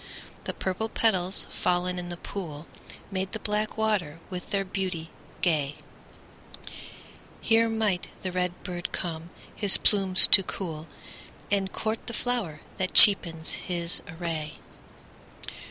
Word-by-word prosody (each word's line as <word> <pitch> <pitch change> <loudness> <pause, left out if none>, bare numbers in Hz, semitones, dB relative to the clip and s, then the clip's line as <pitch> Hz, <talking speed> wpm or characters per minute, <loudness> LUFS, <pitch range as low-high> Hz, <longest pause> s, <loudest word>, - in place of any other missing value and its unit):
The - - -4
purple 190 +4 -3
petals, 190 -5 +1
fallen 180 0 -1
in 175 0 -7
the 175 - -7
pool, 165 -6 -8 0.5
Made 190 0 -4
the 220 - -5
black 210 +1 -2
water 200 -8 -1
with 180 -1 -7
their 200 -1 -1
beauty 185 -4 -4 0.3
gay; 150 -5 0 1.6
Here 225 0 +2
might 215 -5 -1 0.2
the 185 - -3
red 180 0 -3
bird 175 -1 -6
come 165 -1 -4 0.3
his 205 -3 +6
plumes 195 -3 +6
to 195 - +7
cool, 165 -4 -6 0.6
And 195 -2 0
court 220 +1 -4
the 235 - -5
flower 215 -13 -3 0.2
that 185 0 -2
cheapens 165 -6 +7
his 170 -1 -2
array. 160 -2 -5
185 Hz, 125 wpm, -26 LUFS, 170-205 Hz, 1.6 s, to